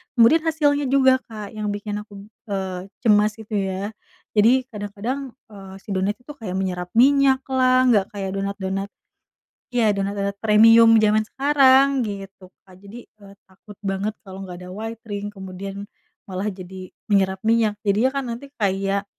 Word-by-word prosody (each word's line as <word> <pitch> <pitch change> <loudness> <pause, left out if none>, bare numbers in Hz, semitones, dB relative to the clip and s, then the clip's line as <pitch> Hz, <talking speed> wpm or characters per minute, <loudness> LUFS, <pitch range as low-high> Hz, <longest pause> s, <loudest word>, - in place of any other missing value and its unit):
Kemudian 240 +8 +6
hasilnya 290 -3 +1
juga 260 -1 +4
Kak 215 -2 -8
yang 215 -1 -4
bikin 205 0 -4
aku, 205 -1 -11 0.2
eee, 190 -2 -4 0.2
cemas, 210 -1 +3
gitu 220 -1 -11
ya. 195 +2 -3 0.5
Jadi, 245 +5 +5
kadang-kadang, 225 +6 -5 0.2
eee, 195 -2 -11
si 205 - -8
donat 195 +2 0
itu 250 +6 -13
kayak 220 -10 -7
menyerap 180 -2 -2
minyak 270 +1 +4
lah, 255 0 +4
nggak 200 -4 +3
kayak 195 -1 -3
donat-donat 195 0 -3 0.9
ya 220 -4 +3
donat-donat 200 0 -3
premium 225 +1 +6
zaman 215 0 +4
sekarang, 275 0 +4
gitu, 195 -4 -6 0.2
Kak. 185 -1 -18
Jadi, 210 +4 -11
eee, 200 -2 -16
takut 195 +2 -16
banget 195 +2 -2
kalau 190 0 -10
nggak 180 -1 -8
ada 180 - -10
white 225 +3 -7
ring 205 -1 -5
kemudian 195 0 -8 0.4
malah 195 0 -4
jadi 185 -1 -8 0.2
menyerap 190 0 +1
minyak 225 -2 +2
jadinya 210 +6 +2
kan 275 -1 -2
nanti 240 +5 -7
kayak, 195 -1 0
205 Hz, 155 wpm, -22 LUFS, 195-230 Hz, 0.9 s, Kemudian